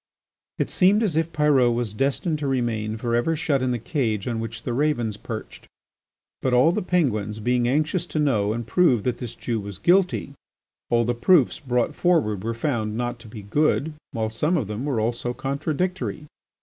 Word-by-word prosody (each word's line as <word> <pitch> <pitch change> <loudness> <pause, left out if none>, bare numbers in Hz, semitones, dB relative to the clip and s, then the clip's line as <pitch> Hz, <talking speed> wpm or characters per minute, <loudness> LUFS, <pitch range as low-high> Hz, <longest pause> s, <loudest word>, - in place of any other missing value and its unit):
It - - -1
seemed 200 +4 +4
as 190 -8 0
if 165 +1 0
Pyrot 145 -6 +3
was 120 -3 -2
destined 140 - 0
to 145 - -2
remain 115 -4 -1
for 115 +1 -1
ever 140 +8 +1
shut 145 -3 0
in 130 - 0
the 125 - 0
cage 115 - -2
on 115 -2 -1
which 115 0 -6
the 120 - -2
ravens 120 -6 0
perched. 110 +1 -8 0.7
But 130 -1 +1
all 130 +7 +5
the 210 - -1
Penguins 110 - 0
being 120 +2 +1
anxious 155 +6 0
to - - -5
know 115 -9 +2
and 115 +1 -3
prove 125 - +3
that 125 +1 -1
this 120 -2 -6
Jew 115 -1 -2
was 100 -2 -7
guilty, 180 -5 +2 0.6
all 120 0 +3
the 120 - +1
proofs 130 +4 +3
brought 125 -5 0
forward 125 - +1
were 115 +1 -2
found 115 -4 -2
not 120 0 -3
to 115 - -13
be 105 -1 -9
good, 150 +7 +1 0.2
while 110 -1 -2
some 150 +10 +1
of 135 - -1
them 105 +6 -4
were 135 -6 0
also 120 +2 -2
contradictory. 155 +5 -2
125 Hz, 190 wpm, -24 LUFS, 115-150 Hz, 0.7 s, all